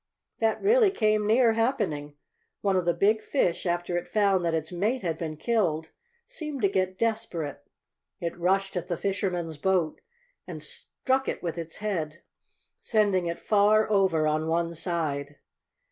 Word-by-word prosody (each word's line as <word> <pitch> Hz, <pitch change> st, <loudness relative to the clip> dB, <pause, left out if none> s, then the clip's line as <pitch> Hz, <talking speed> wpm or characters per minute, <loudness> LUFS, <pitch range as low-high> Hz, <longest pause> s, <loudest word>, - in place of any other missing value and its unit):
That 225 Hz, -1 st, +1 dB
really 440 Hz, +1 st, +5 dB
came 215 Hz, -, +1 dB
near 230 Hz, +1 st, +4 dB
happening. 205 Hz, -, -1 dB, 0.5 s
One 195 Hz, -2 st, +1 dB
of 180 Hz, -2 st, +1 dB
the 175 Hz, -, +3 dB
big 215 Hz, +2 st, +3 dB
fish, 180 Hz, -10 st, 0 dB
after 175 Hz, 0 st, -1 dB
it 175 Hz, -, -4 dB
found 200 Hz, -4 st, +2 dB
that 165 Hz, -1 st, +1 dB
its 160 Hz, +1 st, -3 dB
mate 210 Hz, +7 st, -1 dB
had 165 Hz, -3 st, -1 dB
been 155 Hz, -1 st, -5 dB
killed, 165 Hz, -7 st, 0 dB, 0.4 s
seemed 300 Hz, -, -5 dB
to 200 Hz, -, +5 dB
get 185 Hz, -1 st, -1 dB
desperate. 220 Hz, -10 st, -2 dB, 0.6 s
It 170 Hz, -1 st, -3 dB
rushed 195 Hz, +2 st, +1 dB
at 180 Hz, -1 st, -3 dB
the 175 Hz, -2 st, -2 dB
fishermen's 180 Hz, -5 st, -2 dB
boat 180 Hz, -2 st, +1 dB, 0.5 s
and -, -, -7 dB
struck 265 Hz, 0 st, -1 dB
it -, -, -3 dB
with 170 Hz, -2 st, -2 dB
its 165 Hz, -1 st, -6 dB
head, 170 Hz, -6 st, -3 dB, 0.6 s
sending 200 Hz, -5 st, +1 dB
it 170 Hz, -, -2 dB
far 215 Hz, +1 st, +3 dB
over 190 Hz, -6 st, +3 dB
on 155 Hz, +1 st, 0 dB
one 170 Hz, +1 st, 0 dB
side. 155 Hz, -4 st, -2 dB
185 Hz, 160 wpm, -27 LUFS, 165-215 Hz, 0.6 s, really